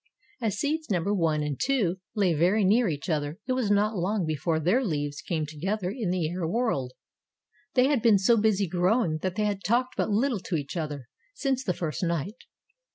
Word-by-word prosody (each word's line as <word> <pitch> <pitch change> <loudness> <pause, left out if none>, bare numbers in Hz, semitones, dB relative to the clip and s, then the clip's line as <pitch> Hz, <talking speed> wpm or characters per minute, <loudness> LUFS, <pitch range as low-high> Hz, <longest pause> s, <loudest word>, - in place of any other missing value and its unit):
As 215 -4 -1
seeds 310 +6 -1
number 195 +1 +1
One 160 -5 +1
and 145 -2 -3
Two 230 -10 +1 0.2
lay 195 -5 +2
very 180 +7 +3
near 220 +5 +4
each 145 -3 -4
other 150 -2 -1
it 255 - 0
was 255 -5 0
not 210 +2 +2
long 190 +1 0
before 155 +1 -1
their 185 - +2
leaves 145 - -2
came 165 -3 -2
together 180 +6 -3
in 225 -8 -2
the 180 -3 0
air 175 0 -3
world. 165 - -1 0.8
They 250 -1 +5
had 275 -3 +2
been 220 -3 +5
so 195 +5 +4
busy 210 -3 +2
growing 180 -1 +1
that 185 +2 -3
they 210 0 0
had 200 -1 -2
talked 250 +3 +1
but - - 0
little 225 +2 +1
to 185 -1 -4
each 145 0 -4
other 150 -6 -4 0.3
since 265 -2 -1
the 180 -7 -1
first 155 -6 -3
night. 170 +2 -1
185 Hz, 200 wpm, -27 LUFS, 160-220 Hz, 0.8 s, They